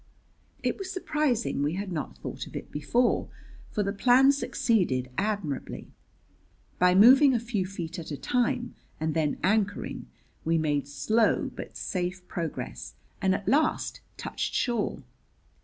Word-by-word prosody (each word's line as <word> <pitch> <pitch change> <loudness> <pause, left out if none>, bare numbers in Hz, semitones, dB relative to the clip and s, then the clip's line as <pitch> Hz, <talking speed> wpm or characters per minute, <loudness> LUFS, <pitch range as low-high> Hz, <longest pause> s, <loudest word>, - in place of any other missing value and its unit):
It - - -1
was 385 -1 -5
surprising 300 - 0
we 145 +2 +1
had 195 0 -4
not 150 - -4
thought 65 - -6
of - - -12
it - - -6
before, 235 +12 +1 0.4
for 210 - -1
the 200 0 -1
plan 255 +6 +6
succeeded 210 - 0
admirably. 200 -9 -3 0.9
By 180 0 +5
moving 260 +6 +8
a - - +2
few 220 -5 -2
feet 175 -3 -5
at 165 - -7
a 145 - -4
time 245 - 0 0.3
and 155 0 -1
then 155 -2 0
anchoring, 205 +1 0 0.4
we 165 0 +2
made 145 -3 0
slow 215 +11 +1
but - - -8
safe 180 0 -3
progress, 165 -2 -5 0.3
and 190 -1 +3
at 205 - -6
last 300 +3 +1 0.2
touched - - -3
shore. 235 -4 0
200 Hz, 140 wpm, -28 LUFS, 160-245 Hz, 0.9 s, moving